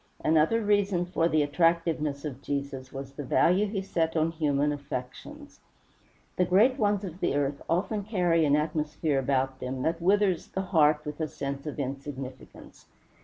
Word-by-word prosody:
Another 160 +9 +3
reason 200 -3 +2
for 170 -2 0
the 155 -2 +3
attractiveness 160 -1 +1
of 135 -3 -6
Jesus 140 -2 -4
was 135 0 -7
the 145 - -6
value 180 +9 +3
he 195 -1 -3
set 165 -3 -1
on 160 +1 +2
human 150 -2 +1
affections. 145 - -7 0.8
The 180 - +4
great 220 +10 +4
ones 205 -1 +1
of 180 -2 -7
the - - 0
earth 140 0 -1
often 200 +5 0
carry 180 -6 +2
an 145 -1 +4
atmosphere 150 -1 -1
about 135 0 0
them 130 0 -4
that 165 +1 -1
withers 195 -1 +2
the 190 - -3
heart 155 -5 +3
with 150 +1 -6
a 155 - 0
sense 140 0 -5
of 150 - -5
insignificance. 135 -1 -7
155 Hz, 165 wpm, -28 LUFS, 140-180 Hz, 0.8 s, The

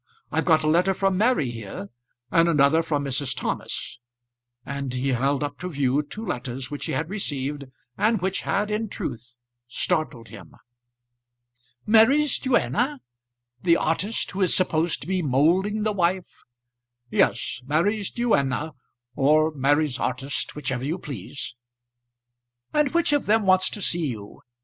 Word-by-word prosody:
I've - - 0
got 160 -3 +4
a - - 0
letter 180 +5 +3
from 195 0 +1
Mary 195 - +2
here, 105 -3 -7 0.4
and 170 -1 +4
another 150 +1 +4
from 150 -3 -1
Mrs. 135 0 -1
Thomas;" - - -4 0.7
and 140 -1 -4
he 130 +2 -1
held 135 +3 +1
up 145 0 -5
to 180 - -4
view 140 -2 +1
two 210 +10 -8
letters 125 - -4
which 145 - -4
he - - -2
had 145 +4 -1
received, 145 -7 -3 0.3
and 220 0 +3
which 190 +2 -1
had, 205 +2 -1
in 215 0 -1
truth, 120 - -6 0.3
startled 125 -4 -2
him. - - -12 1.3
"Mary's 245 +7 +5
duenna; 260 +1 +1 0.6
the 170 -2 +4
artist 190 +8 -1
who 195 - -4
is 185 - +4
supposed 170 -2 +1
to - - -8
be 185 0 0
moulding 175 +10 +2
the 215 0 +1
wife." 180 -1 -1 0.7
"Yes; - - +1
Mary's 200 +8 +1
duenna, 160 - 0 0.4
or 155 +3 +4
Mary's 145 0 +1
artist, 135 +2 -2
whichever 130 -4 -3
you 155 +6 -1
please." 135 - -7 1.2
"And 300 -2 +3
which 335 -3 +2
of 290 - +1
them 215 0 +3
wants 185 0 +4
to 205 - -5
see 170 -3 +1
you? 105 -6 -7
160 Hz, 145 wpm, -24 LUFS, 140-195 Hz, 1.3 s, Mary's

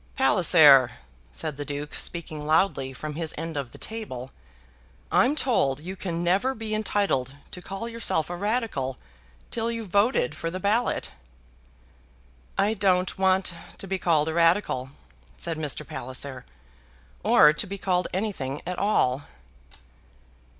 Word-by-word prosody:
"Palliser," 160 - +6 0.4
said 150 - -3
the 145 - -3
Duke, 145 +1 -5
speaking 155 -3 -3
loudly 155 -4 +2
from 150 +3 -6
his 160 +1 -4
end 165 +1 -4
of 140 -4 -3
the - - -12
table, 135 - -6 0.8
"I'm 265 +5 +4
told 145 - +1
you 180 +5 -7
can 175 -2 -3
never 195 +10 +2
be 220 -1 -4
entitled 195 -11 0
to 180 - -8
call 195 +5 -6
yourself 230 -9 0
a - - -3
Radical 200 - -1 0.5
till 230 0 -1
you've 230 -3 -4
voted 200 - +2
for 165 - -4
the 185 +2 -5
ballot." 215 +6 0 1.5
"I 200 +2 +2
don't 185 -3 +1
want 190 -1 +2 0.2
to 195 - -5
be 190 0 -2
called 160 -4 +2
a 160 - -1
Radical," 165 -6 +2 0.5
said 165 -2 -3
Mr. 150 -1 -1
Palliser, 130 +1 -4 0.8
"or 150 0 +6
to - - -2
be 200 +1 -5
called 180 -2 0
anything 180 -9 -3
at 180 0 -3
all." 145 -9 +1
175 Hz, 140 wpm, -26 LUFS, 145-200 Hz, 1.5 s, Palliser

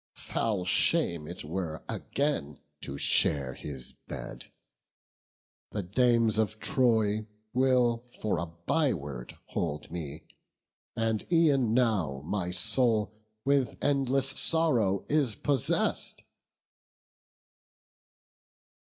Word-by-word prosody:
foul 105 -6 -1
shame 90 - +2
it 90 - -7
were 80 -1 -4
Again 140 - -2 0.2
to 70 - -6
share 70 -2 +3
his 65 -1 -7 0.2
bed; - - -7 1.2
the 105 - -3
dames 115 +2 +2
of 110 0 0
Troy 110 -7 +2 0.3
Will 125 -2 +3 0.2
for 105 -6 0
a 85 - -3
byword 85 - -2
hold 75 -2 -3
me; 80 -3 -6 0.7
and 115 -2 0
e'en 140 -9 +4
now 95 - +1
My 90 0 -2
soul 110 +3 +1 0.3
with 140 -2 +2
endless 135 -1 +2
sorrow 130 - +3
is 145 -8 +1
possess'd." 150 - 0
110 Hz, 90 wpm, -29 LUFS, 85-130 Hz, 1.2 s, e'en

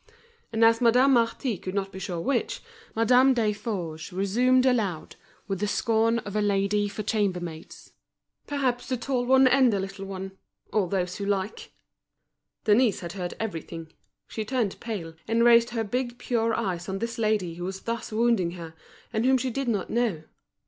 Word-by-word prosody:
And 225 0 +4
as 230 +1 +4
Madame 250 +3 +5
Marty 230 -2 +1
could 185 +1 -6
not 195 -1 -1
be 190 - -8
sure 180 -3 -4
which, 250 +7 -1 0.3
Madame 250 +4 +5
Desforges 205 -8 -2
resumed 245 +8 +2
aloud, 215 -10 0 0.3
with 195 -2 -2
the 210 - 0
scorn 225 +2 +2
of 205 0 -6
a 210 - +2
lady 205 0 +1
for 210 +1 -5
chambermaids: 180 -7 -3 0.5
"Perhaps 265 -4 -1
the 255 - 0
tall 245 0 -1
one 265 +1 +6
and 255 -1 +5
the 200 - 0
little 195 0 -5
one; 190 0 -6 0.4
all 205 -4 +2
those 180 0 -2
who 200 - -4
like!" 200 +1 -2 0.9
Denise 220 0 +3
had 170 -2 -5
heard 180 -3 -5
everything. 165 -5 -6 0.3
She 220 - -4
turned 225 -3 -1
pale, 195 -8 -5
and 230 +1 +2
raised 235 0 +6
her 230 -2 -2
big, 240 +3 -3
pure 230 -2 0
eyes 185 -5 -3
on 190 - -2
this 230 +2 -4
lady 215 -6 +1
who 175 +1 -7
was 190 +1 -5
thus 230 -1 -4
wounding 215 -6 +2
her, 165 -2 -8 0.4
and 220 0 0
whom 260 +1 +4
she 255 0 -2
did 275 +2 -3
not 205 -5 -1
know. 225 -10 0
215 Hz, 175 wpm, -26 LUFS, 190-240 Hz, 0.9 s, one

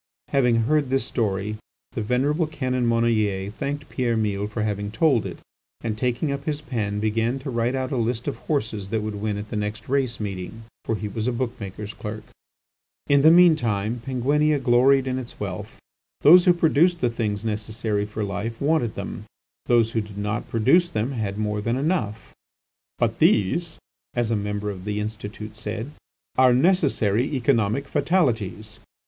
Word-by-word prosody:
Having 125 -4 +3
heard 145 +3 +1
this 135 0 +1
story 105 -2 -1 0.3
the 120 - -3
venerable 140 +8 +1
Canon 130 -5 -1
Monnoyer 110 -4 +1
thanked 145 +5 -4
Pierre 120 -3 0
Mille 105 -2 -1
for 105 +1 -3
having 105 -1 -2
told 120 +2 +2
it, - - -7 0.4
and, 110 -2 -2
taking 125 +6 -1
up 140 - -4
his 150 -2 -1
pen, 105 -8 -3
began 115 +4 0
to 135 0 -6
write 120 +2 0
out 130 +1 -2
a 135 - -1
list 115 0 -1
of - - -1
horses 110 -9 -2
that 110 0 -1
would 110 0 -3
win 105 0 -2
at 105 +1 -6
the - - -3
next 105 +1 -3
race 130 -4 0
meeting. 100 +2 -5 0.2
For 115 - 0
he 105 0 -4
was 110 +2 -3
a - - +2
book 125 0 -2
maker's 105 +1 -6
clerk. 105 0 -6 0.9
In 140 -1 +5
the 155 - +7
mean 170 0 +7
time 115 -3 -1
Penguinia 145 +4 +2
gloried 130 +1 +4
in 130 0 -1
its 125 - -9
wealth. - - -5 0.4
Those 175 +4 +8
who 180 - +7
produced 170 +1 +3
the 125 - +2
things 105 -2 -2
necessary 105 -1 -2
for 105 +1 -4
life, 100 +3 -4
wanted 140 -6 +1
them; - - -6 0.4
those 115 -2 +3
who 115 - 0
did 105 -1 -10
not 105 +1 -3
produce 135 +11 +3
them 110 +2 -1
had 105 -6 -3
more 105 -1 -1
than 115 +3 0
enough. 135 - -2 0.6
"But - - 0
these," 160 - +2 0.4
as 120 -2 0
a - - +2
member 105 0 -2
of 95 -1 -9
the 105 0 -2
Institute 105 0 -6
said, 110 +4 -5 0.5
"are 130 -1 +6
necessary 135 - +2
economic 125 0 +1
fatalities." 110 - 0
115 Hz, 175 wpm, -24 LUFS, 105-135 Hz, 0.9 s, Those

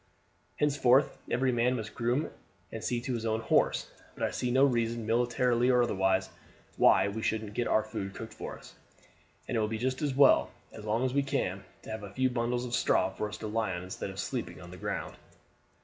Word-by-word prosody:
Henceforth 140 -2 +3
every 130 +1 +2
man 120 +1 +2
must 110 -3 -5
groom 120 +6 0 0.4
and 115 - -6
see 120 - 0
to 130 +1 -3
his 115 -2 -3
own 110 -1 0
horse, 115 - +1 0.2
but - - -5
I - - +1
see 125 - -2
no 130 +3 +5
reason, 115 -3 0
military 120 +1 +2
or 125 -1 +5
otherwise, 95 -4 +1 0.4
why - - +5
we 105 +2 -4
shouldn't 110 -2 -2
get 120 - -1
our 110 - +3
food 105 -3 -5
cooked 110 -1 -7
for - - -7
us; - - -15 0.7
and - - -2
it - - +2
will 105 - +1
be 110 +1 -3
just 130 +4 -1
as 145 -3 0
well, 140 - +6 0.2
as 110 - -10
long 110 +4 +1
as 130 - -1
we 140 - +3
can, 115 -9 -2 0.2
to - - -8
have 110 0 -4
a 100 - -7
few 130 +6 0
bundles 120 0 -1
of 120 - -6
straw - - +2
for 105 - -3
us 105 - -7
to 110 - -5
lie 110 -3 -1
on 90 - -5
instead 95 +1 -5
of 95 0 -8
sleeping - - -4
on - - -11
the - - -9
ground. - - -4
115 Hz, 220 wpm, -30 LUFS, 110-125 Hz, 0.7 s, well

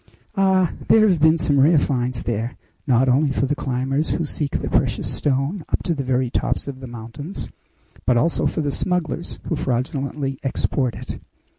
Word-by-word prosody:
Ah! 190 -3 +3
there 215 -1 +6
have 180 -5 +3
been 160 +2 +5
some 145 -3 +2
rare 155 +4 +6
finds 125 -4 0
there, 115 +1 -2 0.3
not 130 0 +4
only 135 +3 +3
for 135 - +1
the 140 - 0
climbers 135 +1 -1
who 170 - 0
seek 145 -1 -1
the - - -4
precious - - +1
stone 145 +6 0
up - - 0
to 170 - 0
the 140 -3 -3
very 130 -1 0
tops - - -1
of 135 -2 -6
the 130 - -8
mountains, 120 - -7 0.6
but 125 -1 +4
also 165 +8 +2
for - - -1
the 145 -1 -1
smugglers 175 +1 -1
who 165 - +1
fraudulently 135 +1 -2
export 130 -2 0
it. - - -7
140 Hz, 180 wpm, -22 LUFS, 130-160 Hz, 0.6 s, there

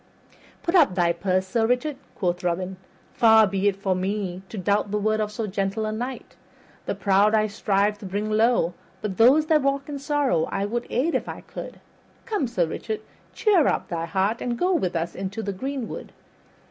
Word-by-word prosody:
"Put 340 - -1
up 310 - +5
thy 175 -2 +3
purse, 185 +2 0
Sir 225 +4 +1
Richard," 250 +5 0 0.2
quoth 180 -1 -1
Robin. 180 +2 -2 0.4
"Far 220 -2 +6
be 195 0 0
it 200 - +2
from 190 -2 -1
me 190 -2 -2
to 220 - -7
doubt 205 +2 +1
the 210 - 0
word 215 +1 +1
of 210 -1 -1
so 220 +1 -3
gentle 195 +2 -2
a 215 - -2
knight. 245 +4 -5 0.5
The - - -1
proud 200 +2 +3
I 215 0 +3
strive 205 0 0
to 200 - -7
bring 205 +3 -2
low, 220 -5 +3 0.3
but 195 -4 -3
those 270 +7 +6
that 310 -1 +3
walk 275 0 0
in 290 -2 -5
sorrow 280 - +1
I 195 0 -2
would 235 +3 -3
aid 280 +8 0
if - - -1
I - - -6
could. - - -9 0.5
Come, 415 - -1
Sir 185 -7 +1
Richard, 215 +6 -4 0.3
cheer 385 -9 +4
up - - 0
thy 165 -1 -3
heart 195 +5 0
and 240 -1 -2
go 365 +6 +2
with 185 - 0
us 165 +1 -2
into 195 +3 -4
the 200 - -3
greenwood. 260 +4 -5
210 Hz, 200 wpm, -24 LUFS, 190-245 Hz, 0.5 s, Far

